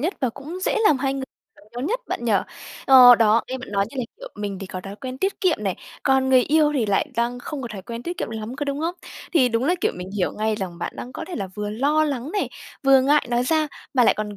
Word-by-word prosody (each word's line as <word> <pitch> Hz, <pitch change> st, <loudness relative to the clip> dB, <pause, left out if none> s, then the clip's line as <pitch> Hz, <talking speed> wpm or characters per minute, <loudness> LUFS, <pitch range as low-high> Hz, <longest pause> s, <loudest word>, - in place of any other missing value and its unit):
nhất 340 Hz, +8 st, -1 dB
và 255 Hz, -, +1 dB
cũng 300 Hz, +9 st, -8 dB
dễ -, -, +1 dB
làm 290 Hz, -8 st, +4 dB
hai 270 Hz, 0 st, 0 dB
người 270 Hz, -1 st, -3 dB, 0.5 s
nhau 240 Hz, -, -5 dB
nhất, -, -, -1 dB
bạn -, -, -3 dB
nhỉ. -, -, +1 dB, 0.5 s
Ờ, 250 Hz, -2 st, +10 dB
đó, 225 Hz, 0 st, +4 dB
nghe 260 Hz, -, -3 dB
bạn 255 Hz, -, -9 dB
nói 200 Hz, 0 st, +1 dB
như -, -, -11 dB
là, 250 Hz, -, 0 dB
kiểu, -, -, -8 dB
mình 205 Hz, -2 st, -4 dB
thì 195 Hz, -, -7 dB
có 185 Hz, 0 st, -6 dB
thói 195 Hz, +2 st, -9 dB
quen 260 Hz, +1 st, -7 dB
tiết 390 Hz, +5 st, -1 dB
kiệm 370 Hz, -5 st, +2 dB
này, 190 Hz, -, -1 dB, 0.3 s
còn 265 Hz, 0 st, +3 dB
người 260 Hz, -1 st, +6 dB
yêu 300 Hz, +2 st, +3 dB
thì 245 Hz, -6 st, +1 dB
lại 200 Hz, +9 st, +1 dB
đang 240 Hz, +1 st, 0 dB
không 280 Hz, +2 st, -6 dB
có 240 Hz, -, -5 dB
thói 195 Hz, -3 st, -7 dB
quen 230 Hz, +4 st, -7 dB
tiết 345 Hz, +4 st, -5 dB
kiệm -, -, -3 dB
lắm, 220 Hz, +3 st, -6 dB
có 290 Hz, -, -2 dB
đúng 280 Hz, 0 st, -2 dB
hông? 335 Hz, +3 st, -1 dB, 0.4 s
Thì 265 Hz, -7 st, +4 dB
đúng 230 Hz, +1 st, 0 dB
là, 345 Hz, +6 st, +3 dB
kiểu, -, -, +1 dB
mình 180 Hz, +1 st, -7 dB
hiểu 185 Hz, -, 0 dB
ngay 215 Hz, +1 st, -1 dB
rằng 185 Hz, -4 st, -5 dB
bạn -, -, -4 dB
đang 250 Hz, -, -7 dB
có -, -, -6 dB
thể 360 Hz, -, -5 dB
là 195 Hz, -3 st, -4 dB
vừa 210 Hz, 0 st, -4 dB
lo 285 Hz, +8 st, +2 dB
lắng 280 Hz, 0 st, -3 dB
này, 410 Hz, -, -1 dB, 0.3 s
vừa 270 Hz, -1 st, +6 dB
ngại 290 Hz, +3 st, +3 dB
nói 240 Hz, 0 st, +2 dB
ra, 315 Hz, +1 st, +2 dB, 0.3 s
mà 250 Hz, -, +5 dB
lại -, -, +5 dB
còn, 210 Hz, -1 st, -4 dB
255 Hz, 280 wpm, -23 LUFS, 215-290 Hz, 0.5 s, Ờ